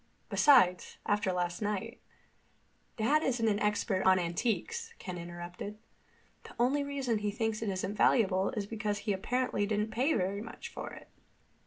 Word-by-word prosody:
Besides, 235 -12 +5
after 205 -2 +1
last 175 0 -2
night—" 210 +3 -3 1.0
"Dad 280 +8 +3
isn't 240 -6 +1
an 205 -1 +2
expert 210 -2 +1
on 190 0 +6
antiques," 245 - -2
Ken 180 -3 -6
interrupted. 175 +4 -7 0.7
"The - - -12
only 265 +4 +2
reason 270 -6 -1
he 210 0 -1
thinks 220 +1 -2
it 220 - -1
isn't 190 +1 -2
valuable 195 -4 +3
is 205 - -1
because 210 -1 -2
he 210 - +2
apparently 210 +1 0
didn't 210 +1 0
pay 270 +7 +2
very 195 +2 -1
much 230 - -8
for - - -6
it." - - -12
210 Hz, 155 wpm, -31 LUFS, 190-235 Hz, 1.0 s, on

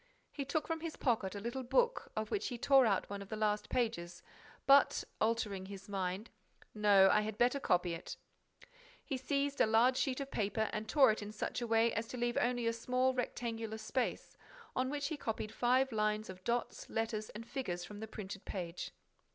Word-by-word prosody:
He 280 - -4
took 300 +2 -1
from 325 -1 -2
his 325 -1 -5
pocket 220 -7 0
a - - -3
little 235 +5 -3
book 475 - +1
of 215 0 -3
which 410 - 0
he 245 - -4
tore 270 0 +5
out 195 -3 +1
one 200 0 -5
of 200 - -9
the 220 - -3
last 210 -1 0
pages. 175 -8 -2 0.4
But, 275 +1 +6 0.2
altering 215 -4 0
his 195 -1 -9
mind: 195 +2 -3 0.4
"No, 205 -2 +6
I 210 - +4
had 215 0 -4
better 250 +4 +3
copy 180 -7 +1
it—" 165 - -6 0.9
He 275 - -2
seized 280 +2 0
a - - +5
large 230 +4 +4
sheet 265 -1 0
of 275 -1 -5
paper 215 +1 0
and 220 0 -3
tore 275 -6 +6
it 215 - -3
in 205 0 -6
such 215 +3 -3
a 240 - -2
way 225 0 +3
as 225 +1 -2
to 250 - -6
leave 240 0 0
only 245 -1 +1
a 230 - +2
small 255 +3 +1
rectangular 230 -3 -3
space, 230 +3 -2 0.4
on 255 0 +1
which 285 0 -2
he 315 - -3
copied 220 -4 -3
five 255 +3 +3
lines 215 -1 0
of 185 0 -13
dots, 240 +3 -2
letters 220 -1 -2
and 230 +2 -8
figures 180 -11 -3
from 205 +2 -9
the 220 - -5
printed 200 -2 -7
page. 175 -3 -5
225 Hz, 200 wpm, -35 LUFS, 210-255 Hz, 0.9 s, But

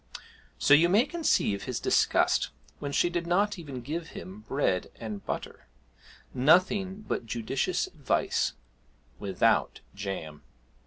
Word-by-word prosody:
So 145 - +4
you 165 +4 +6
may 210 +7 +5
conceive 300 - 0
his - - -3
disgust - - +2 0.3
when 145 - -4
she 160 - +3
did 175 -1 -2
not 200 +3 +1
even 140 -6 -7
give 160 +6 -4
him 190 +3 -8
bread 135 -10 0
and 110 -3 -6
butter; - - -5 0.7
nothing 185 +8 +3
but 115 - -2
judicious 135 - -1
advice 150 -6 0 0.7
without 95 -2 +1
jam. 95 -7 -6
150 Hz, 120 wpm, -28 LUFS, 115-185 Hz, 0.7 s, you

